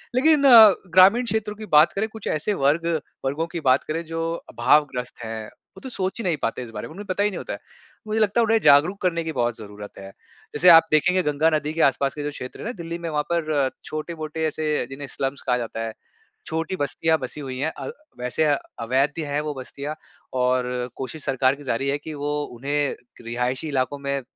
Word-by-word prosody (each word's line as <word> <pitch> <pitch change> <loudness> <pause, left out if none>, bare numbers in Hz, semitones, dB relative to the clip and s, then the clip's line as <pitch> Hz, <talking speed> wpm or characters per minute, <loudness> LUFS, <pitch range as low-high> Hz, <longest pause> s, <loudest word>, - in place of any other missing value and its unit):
लेकिन 295 +2 +4
अ, 225 -6 +10 0.2
ग्रामीण 195 +7 +6
क्षेत्रों 220 -2 -2
की 215 +1 -8
बात 150 +2 +6
करें 210 +3 -1
कुछ 220 -2 -8
ऐसे 155 +7 0
वर्ग 160 +1 +1 0.4
वर्गों 145 +5 -1
की 170 - -3
बात 130 +2 +4
करें 165 +2 -3
जो 165 +1 -3 0.2
अभावग्रस्त 125 0 +1
हैं। 110 -1 -5 0.3
वो 190 - -11
तो 260 - -7
सोच 190 -5 -3
ही - - -3
नहीं 170 -4 +1
पाते 115 +2 -2
इस 120 - -9
बारे - - -6
में, - - -13
उन्हें 205 +4 -8
पता 185 +2 +1
ही 210 - +3
नहीं 195 - -6
होता - - -5
है। - - -7 0.5
मुझे 215 +1 0
लगता 215 +1 +2
है - - +3
उन्हें 225 0 +3
जागरूक 160 +7 +5
करने 170 -2 0
की 160 - -3
बहुत 120 -3 0
ज़रूरत 105 -1 -10
है। 95 0 -9 0.4
जैसे 180 +5 +5
आप 165 -1 +10
देखेंगे 180 +4 +3
गंगा 150 +1 +2
नदी 150 0 -2
के 165 - -1
आस-पास 135 0 +2
के 150 - -5
जो 145 - -2
क्षेत्र 125 -2 -8
हैं - - -7
ना, - - -2
दिल्ली 170 -4 -6
में 170 -1 -4
वहाँ 150 -1 0
पर 155 -5 +1 0.2
छोटे-मोटे 155 0 -4
ऐसे 155 -2 -1
जिन्हें 140 +1 -7
स्लम्स 135 +1 -3
कहा 125 -1 +3
जाता 115 -1 -4
है। 110 - -6 0.5
छोटी 165 +3 -2
बस्तियाँ 160 +3 +1
बसी 150 - -6
हुई 130 -2 -6
हैं। 155 +4 0
अ, - - -5 0.3
वैसे 125 +5 -1 0.4
अवैध 130 +5 +1
हैं 145 +1 -1
वो 150 -1 -3
बस्तियाँ 140 +3 -6 0.4
और 125 0 +2 0.3
कोशिश 140 +3 -6
सरकार 130 0 +2
की 145 - -13
जारी 135 +1 -1
है, 140 - 0
कि 155 +2 -8
वो 145 0 -3 0.3
उन्हें 145 +3 -1 0.3
रिहायशी 125 +5 -2
इलाकों 135 0 -1
में 140 0 0
अ, - - -9
150 Hz, 220 wpm, -23 LUFS, 135-170 Hz, 0.5 s, अ